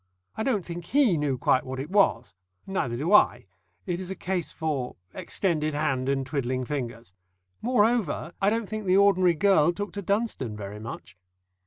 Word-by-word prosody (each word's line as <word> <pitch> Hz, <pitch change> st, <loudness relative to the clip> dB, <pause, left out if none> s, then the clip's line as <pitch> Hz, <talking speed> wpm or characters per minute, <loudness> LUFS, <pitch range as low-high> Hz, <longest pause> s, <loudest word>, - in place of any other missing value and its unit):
I -, -, -4 dB
don't 220 Hz, -7 st, 0 dB
think 170 Hz, 0 st, -6 dB
he 260 Hz, -4 st, +3 dB
knew 145 Hz, -4 st, 0 dB
quite 130 Hz, +1 st, +2 dB
what 130 Hz, 0 st, -6 dB
it 145 Hz, +6 st, -6 dB
was. 125 Hz, -, +2 dB, 0.3 s
Neither 130 Hz, -11 st, -2 dB
do 160 Hz, +10 st, 0 dB
I 210 Hz, -, +5 dB, 0.4 s
it 175 Hz, -2 st, -2 dB
is 185 Hz, -1 st, -6 dB
a 190 Hz, -, -4 dB
case 180 Hz, -2 st, -3 dB
for 145 Hz, -6 st, -3 dB, 0.2 s
extended 155 Hz, -5 st, -1 dB
hand 135 Hz, -3 st, 0 dB
and 135 Hz, -1 st, 0 dB
twiddling 130 Hz, -2 st, -2 dB
fingers. 120 Hz, -7 st, -5 dB, 0.5 s
Moreover, 220 Hz, -, +1 dB
I 195 Hz, -, +4 dB
don't 225 Hz, 0 st, -1 dB
think 215 Hz, -1 st, -5 dB
the 185 Hz, +1 st, +4 dB
ordinary 185 Hz, -3 st, +4 dB
girl 175 Hz, -2 st, +4 dB
took 205 Hz, 0 st, -5 dB
to 200 Hz, -, -4 dB
Dunstone 200 Hz, -, -1 dB
very 105 Hz, 0 st, -7 dB
much. 105 Hz, -5 st, -8 dB
170 Hz, 175 wpm, -26 LUFS, 130-200 Hz, 0.5 s, I